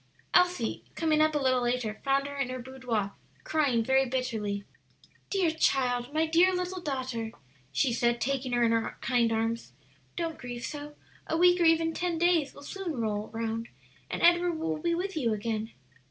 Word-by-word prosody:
Elsie, 355 -11 +2
coming 310 -2 +2
up 310 0 +3
a - - +4
little 260 -3 +2
later, 240 -3 -1
found 275 0 +2
her 285 0 -6
in 275 -3 -1
her 255 - -3
boudoir 245 -5 -3 0.3
crying 280 -7 +2
very 265 +3 +4
bitterly. 225 -6 -2 0.7
"Dear 375 -5 +2
child, 250 -5 +1
my 315 +2 +2
dear 335 +4 +4
little 360 0 -3
daughter," 260 -7 -3 0.4
she 230 - +1
said, 235 0 +1
taking 260 +2 -1
her 240 0 +3
in 230 - +4
her 230 0 0
kind 235 -2 +2
arms, 225 +1 -1 0.4
"don't 330 -2 -3
grieve 245 -1 -6
so; 295 0 -7 0.3
a 320 - 0
week 355 +1 +5
or - - +5
even 325 0 +4
ten 345 0 -1
days 335 -4 +2
will - - -12
soon 345 -4 -4
roll 215 -2 -1
round, 225 0 -3 0.4
and - - -3
Edward 345 0 +5
will 320 -1 -2
be 340 +2 0
with 385 +2 -3
you 240 -8 +1
again." 220 +1 -2
265 Hz, 180 wpm, -29 LUFS, 235-325 Hz, 0.7 s, week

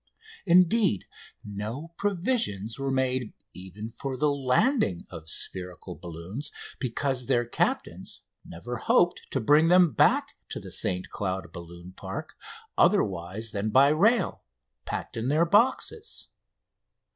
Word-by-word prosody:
Indeed, 180 - +4 0.4
no 105 +10 -5
provisions 175 - -1
were 135 0 -1
made 130 -3 0 0.2
even 95 +5 -8
for 135 +2 -5
the 150 +1 +2
landing 135 - +1
of 80 -2 -8
spherical 90 0 -3
balloons, 85 - -7 0.3
because 130 0 -1
their 120 -3 +2
captains 120 - -2 0.2
never 120 +9 -7
hoped 175 +9 +2
to 135 - -1
bring 150 +7 +5
them 180 -2 +6
back - - +3 0.2
to - - -4
the - - -10
St 90 0 -2
Cloud 95 -3 -3
balloon 85 +1 -10
park - - -7 0.4
otherwise 95 +4 +1
than 105 0 -2
by 135 +5 +6
rail, 195 +7 +2 0.4
packed - - -5
in 115 +2 -2
their 155 +5 +3
boxes. 255 - +1
125 Hz, 120 wpm, -27 LUFS, 95-160 Hz, 0.4 s, them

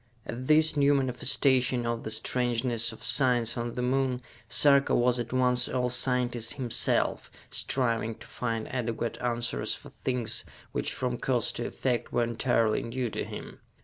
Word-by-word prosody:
At 125 +2 -6
this 155 0 +5
new 145 0 +4
manifestation 130 -1 +2
of 115 0 -2
the - - -5
strangeness 120 0 0
of 110 - -11
science 120 0 +2
on 120 -1 -4
the 125 - -2
Moon, 130 0 0 0.3
Sarka 140 +1 +4
was 120 0 +2
at 120 -1 -4
once 125 -1 +2
all 125 -1 0
scientist 125 -2 0
himself, 125 -4 0 0.2
striving 115 -3 0
to - - -14
find 115 -2 -3
adequate 115 -2 -2
answers 120 -1 -1
for - - -12
things 120 -3 -1 0.3
which, - - -2
from 125 -1 -3
cause 125 -3 0
to 120 - -4
effect, 120 -3 -2
were 120 - +2
entirely 115 -1 +1
new 120 0 -3
to - - -3
him. - - -8
125 Hz, 155 wpm, -28 LUFS, 115-130 Hz, 0.3 s, this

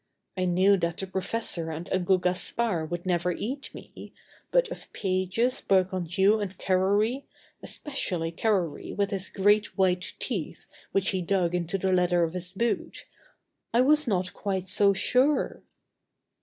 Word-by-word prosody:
I 185 -1 0
knew 185 +3 +4
that 170 -2 -2
the 195 - -3
professor 190 -3 -2
and 160 +2 -5
Uncle 185 0 +3
Gaspard 180 -1 -1
would 175 +1 -4
never 180 -1 +1
eat 265 +10 -5
me, - - -12 0.3
but - - +3
of - - -9
Pages, 190 +6 0
Bergounhoux, 190 +2 +2
and 190 -2 -5
Carrory, 205 +8 +1 0.4
especially 180 - -2
Carrory 180 -4 -1
with 200 0 +1
his 195 -1 -4
great 205 +2 +2
white 185 -1 +1
teeth 195 - -4 0.3
which 195 -1 +1
he 190 - -1
dug 175 -1 0
into 180 +2 -1
the 190 0 0
leather 180 -1 +3
of 165 0 -1
his 180 0 -4
boot, 230 +4 -2 0.7
I 240 - +6
was 300 +2 +4
not 185 -4 0
quite 190 -2 -3
so 200 +2 +4
sure. 255 +8 +1
190 Hz, 145 wpm, -27 LUFS, 180-210 Hz, 0.7 s, I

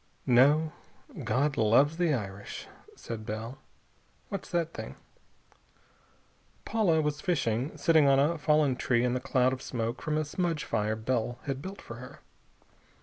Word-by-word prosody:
"No.... 145 +6 +5 0.5
God 140 +2 +1
loves 135 +8 +4
the 175 -2 +2
Irish," 100 -6 -4 0.3
said 115 -2 -7
Bell. 110 +4 -5 0.7
"What's 195 -1 -5
that 170 -2 -1
thing?" - - -7 1.7
Paula 185 -8 +2
was 150 -1 -2
fishing, 130 -6 -1
sitting 160 -3 +4
on 135 0 +5
a 155 +4 +2
fallen 150 -3 +3
tree 120 -1 +1
in 125 - +1
the 125 - 0
cloud 130 0 +2
of 130 - -5
smoke 115 -2 -3
from 155 -1 -1
a 155 - 0
smudge 165 0 -1
fire 105 +1 -1
Bell 120 +1 -1
had 135 -1 -3
built 190 +4 -8
for 115 - -9
her. 125 +1 -11
135 Hz, 145 wpm, -29 LUFS, 120-155 Hz, 1.7 s, No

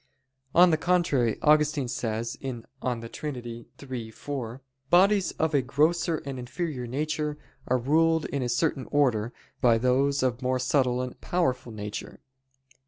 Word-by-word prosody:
On 175 0 +7
the 160 - +3
contrary, 150 -11 +2
Augustine 150 -2 +3
says 115 -1 -3
(De 125 -2 -5
Trin. 120 -6 -6 0.3
iii, 115 -3 -4
4): 130 -1 -6 0.3
"Bodies 195 +3 +4
of 160 -1 -1
a 140 - +4
grosser 160 +6 +1
and 135 -2 -5
inferior 125 0 -4
nature 150 +3 -2 0.3
are 130 - +3
ruled 160 +5 +2
in 140 - -2
a 125 - -1
certain 135 +1 0
order 120 -6 +2 0.3
by 120 -2 +5
those 130 +3 +2
of 125 -2 0
a - - -11
more 130 0 +1
subtle 125 -1 +1
and 125 - -8
powerful 130 -9 -1
nature." 105 -1 -6
130 Hz, 145 wpm, -27 LUFS, 120-155 Hz, 0.3 s, On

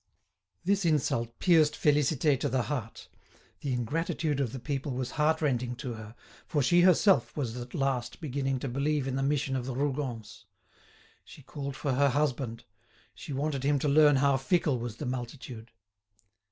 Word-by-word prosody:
This 200 +1 +2
insult 120 -7 0
pierced 155 -4 +4
Félicité 145 -1 +2
to - - -1
the 130 -1 +1
heart. 115 -2 -5 0.5
The 140 - -3
ingratitude 145 +4 -1
of 130 -5 0
the 130 - -6
people 140 +1 -3
was 125 0 -3
heartrending 150 -6 +1
to 125 -1 -5
her, 110 0 -10 0.3
for 145 -3 +1
she 175 +7 +4
herself 185 +1 +4
was 125 -5 -2
at 120 0 -7
last 130 -3 -1
beginning 135 -3 -2
to - - -3
believe 140 +2 0
in 130 - -2
the 135 - -1
mission 140 -1 0
of 125 -1 -3
the 130 - -3
Rougons. 130 -5 -3 0.8
She 145 - -14
called 140 0 -6
for 140 -1 -1
her 140 +2 +3
husband. 130 -4 -1 0.5
She - - -9
wanted 140 0 -1
him 145 +1 +2
to 145 - -1
learn 145 0 +6
how 140 0 +3
fickle 140 -1 +1
was 120 -2 -5
the - - -6
multitude. 125 -2 -6
135 Hz, 165 wpm, -29 LUFS, 125-150 Hz, 0.8 s, learn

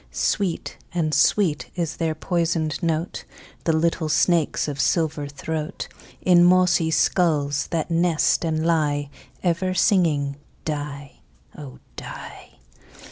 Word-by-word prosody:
Sweet 190 -5 -1 0.2
and 155 -3 0
sweet 155 +2 +2
is 170 -3 -2
their 160 -2 -1
poisoned 165 -1 -1
note, 165 0 -2 0.4
The 165 - +3
little 160 0 0
snakes' 165 -1 +2
of 145 -1 -2
silver 155 -3 0
throat, 155 +4 -5 0.4
In 175 -1 +6
mossy 180 -2 +4
skulls 150 -4 +1
that 165 0 -2
nest 170 -1 +2
and 160 -1 -1
lie, 145 -4 +1 0.3
Ever 185 +1 0
singing 150 -9 +2 0.3
"die, 145 -2 -5 0.3
oh! 65 -3 -10 0.2
die." - - -9
160 Hz, 115 wpm, -23 LUFS, 150-175 Hz, 0.4 s, In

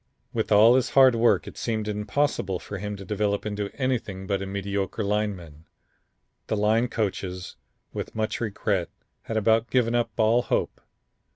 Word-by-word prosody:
With - - -2
all 110 +3 +7
his 130 -1 +2
hard 130 -2 +6
work 115 0 +3
it - - -10
seemed 110 -2 -2
impossible 105 -2 -1
for 100 +2 -7
him 105 +1 -4
to 100 -1 -9
develop 105 +1 -1
into 105 -1 -3
anything 120 -8 -2
but 100 0 -1
a 100 - -4
mediocre 100 +1 -3
lineman. 100 -7 -3 0.8
The 110 - -1
line 110 +4 +2
coaches, 95 -5 -3 0.4
with - - -5
much 110 +1 -2
regret, 100 -4 -1 0.4
had 110 - -2
about 110 +2 +2
given 120 -2 +2
up 120 -1 +1
all 115 +2 +4
hope. - - -2
105 Hz, 160 wpm, -25 LUFS, 100-115 Hz, 0.8 s, all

